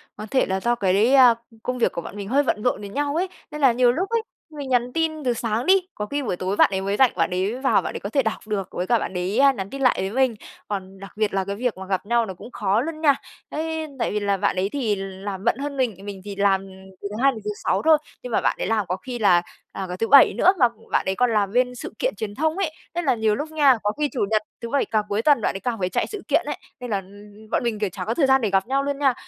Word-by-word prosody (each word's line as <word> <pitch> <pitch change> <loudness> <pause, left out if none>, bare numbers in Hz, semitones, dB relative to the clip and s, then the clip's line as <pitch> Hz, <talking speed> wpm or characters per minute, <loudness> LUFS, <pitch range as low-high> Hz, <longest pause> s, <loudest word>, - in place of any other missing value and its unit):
có 215 - -7
thể 260 - +3
là 190 0 -1
do 240 +3 +1
cái, 205 +5 +2
à, 250 -3 +8 0.3
công 250 0 -2
việc 240 - +2
của 170 - -4
bọn 185 - -9
mình 200 -1 -6
hơi 285 +3 +3
bận 210 -5 -1
rộn 250 - +1
với 200 - -7
nhau 285 +5 -2
ấy. 365 +3 +1 0.2
Nên 300 0 -6
là 265 -3 +6
nhiều 245 0 +4
lúc 370 - -2
ấy, 460 -1 +1 0.3
mình 285 -3 -7
nhắn 245 0 +1
tin 315 -2 -1
từ 245 -2 +1
sáng 230 0 -2
đi, 380 - +6 0.2
có 210 - -3
khi 285 +5 -3
buổi 195 -6 -1
tối 190 +2 -2
bạn - - +5
ấy 190 - 0
mới 200 +1 -1
rảnh, 265 -3 +5
bạn 165 -2 +1
ấy 195 +7 -1
vào 265 - +3
bạn - - -5
ấy - - -3
có 200 - -5
thể 275 +3 +2
đọc 220 0 -3
được, 195 -3 -2
với 180 - -3
cả 235 -2 +3
bạn - - -4
đấy, 185 +6 -1
ơ, 275 0 +6
nhắn 195 -4 -5
tin 275 0 -7
lại 255 - +4
với 190 - -1
mình. 260 -2 +2 0.3
Còn 195 -1 -5
đặc 195 - -10
biệt 215 -2 0
là 195 -1 +1
cái 200 0 -3
việc 240 -3 -2
mà 190 - -7
gặp 190 0 -2
nhau 235 +1 +2
nó 190 - -6
cũng 235 +7 -12
khó 205 +2 +1
luôn 315 +2 -5
nha, 285 -3 +5 0.3
ấy 320 0 -3
tại - - 0
vì 210 - 0
là 200 -1 0
bạn 195 -1 0
ấy 190 +2 0
thì 230 -7 0
làm 195 0 -6
bận - - +2
hơn 280 0 -4
mình, 245 -6 0
mình 195 -2 -7
thì 200 -1 -6
làm 195 -1 +2 0.3
từ 200 - -3
thứ 210 - -5
Hai 275 - +6
đến 220 -4 -8
thứ 210 - -1
Sáu - - +2
thôi, 315 -1 +7 0.3
nhưng 250 - -6
mà - - +2
bạn - - +1
đấy - - -1
làm 215 -3 +1
có 180 - -1
khi 240 +4 -7
là, 180 -5 +5 0.3
à, 190 - -5
cả 180 - -3
thứ 225 - 0
Bảy 280 -1 +7
nữa. 370 +3 +5
Mà 245 - +6 0.2
bạn - - +1
ấy 190 0 0
còn 250 -1 +2
làm 205 -2 +1
bên 250 +1 +1
sự - - -7
kiện - - 0
truyền 205 -2 -5
thông 315 +4 0
ấy, 370 -6 0 0.2
nên 345 - -1
là 265 - +3
nhiều 220 -1 +1
lúc 310 +5 -5
nha, 285 -5 +5
có 205 - +1
khi 295 -1 +1
Chủ 245 -8 0
nhật, 215 -1 +3 0.2
thứ 235 - -5
Bảy, 280 +1 +1
càng 215 -1 0
cuối 205 +2 0
tuần 285 -3 +4
bạn - - 0
ấy 195 - -3
càng 230 +1 -3
phải 180 - 0
chạy - - -1
sự 420 -2 -7
kiện 310 +2 +2
ấy. 295 - -3 0.2
Nên 245 - -6
là, 200 - +2
ưm, 195 - -7 0.3
ưm 215 +1 -16
bọn - - +1
mình, 225 -3 -1
kiểu, 210 - 0
chả 185 0 -6
có 225 - 0
thời 275 +1 +2
gian 265 -1 +4
để 215 - +1
gặp 195 +1 +1
nhau 275 +2 +1
luôn 280 0 -2
nha. 270 -3 +3
230 Hz, 310 wpm, -23 LUFS, 200-275 Hz, 0.3 s, à